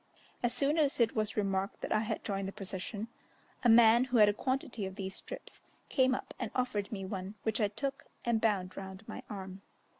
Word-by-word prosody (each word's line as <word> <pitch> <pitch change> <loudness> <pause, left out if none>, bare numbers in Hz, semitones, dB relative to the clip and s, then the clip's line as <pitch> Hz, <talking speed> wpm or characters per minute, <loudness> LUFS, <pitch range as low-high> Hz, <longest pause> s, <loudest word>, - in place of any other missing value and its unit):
As 240 - +2
soon 280 +6 +2
as 290 -4 +2
it 230 -2 +3
was 215 -1 -1
remarked 195 -1 0
that - - -4
I 215 - +4
had 220 - -2
joined 195 -2 -2
the - - -3
procession, 200 +2 -5 0.6
a 240 - +5
man 230 +1 +8
who 255 -2 +1
had 210 -2 +8
a - - +2
quantity 255 -3 -2
of 190 - -8
these 190 -1 -4
strips, - - -8 0.3
came 260 -1 +4
up - - -6
and 235 - -2
offered 215 -6 0
me 195 -3 -4
one, 190 +1 -5
which 220 +1 +1
I 210 - +4
took 275 +7 -4 0.2
and 235 -2 +2
bound 195 -5 +1
round 190 +2 -8
my 220 - -6
arm. 190 -2 -6
215 Hz, 210 wpm, -33 LUFS, 195-240 Hz, 0.6 s, man